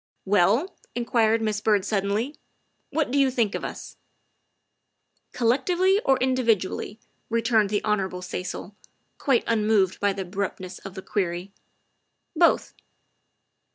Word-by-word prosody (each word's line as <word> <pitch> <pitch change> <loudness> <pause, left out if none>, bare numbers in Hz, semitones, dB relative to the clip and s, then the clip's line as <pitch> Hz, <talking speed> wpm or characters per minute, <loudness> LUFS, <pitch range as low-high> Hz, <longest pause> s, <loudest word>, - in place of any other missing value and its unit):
" - - -50
Well," 225 - +2 0.2
inquired 230 -2 +2
Miss 210 -1 -1
Byrd 210 -3 +2
suddenly, 210 +7 -1 0.3
" - - -47 0.2
what 295 -3 -1
do 280 - +2
you 275 -1 +4
think 235 -5 0
of - - -4
us? - - -7 0.5
" - - -51
" - - -47
Collectively 350 - +2
or 270 -1 +3
individually?" 230 -6 0 0.3
returned 225 -2 +2
the 205 0 -1
Hon. 195 -4 -1
Cecil, 180 +2 -5 0.4
quite 265 -4 +2
unmoved 210 -4 +2
by 205 0 +2
the 195 0 -4
abruptness 185 -1 -5
of 195 0 -10
the 190 - -7
query. 180 -1 -2 0.8
"Both." 335 +1 +3
215 Hz, 135 wpm, -25 LUFS, 195-250 Hz, 0.8 s, you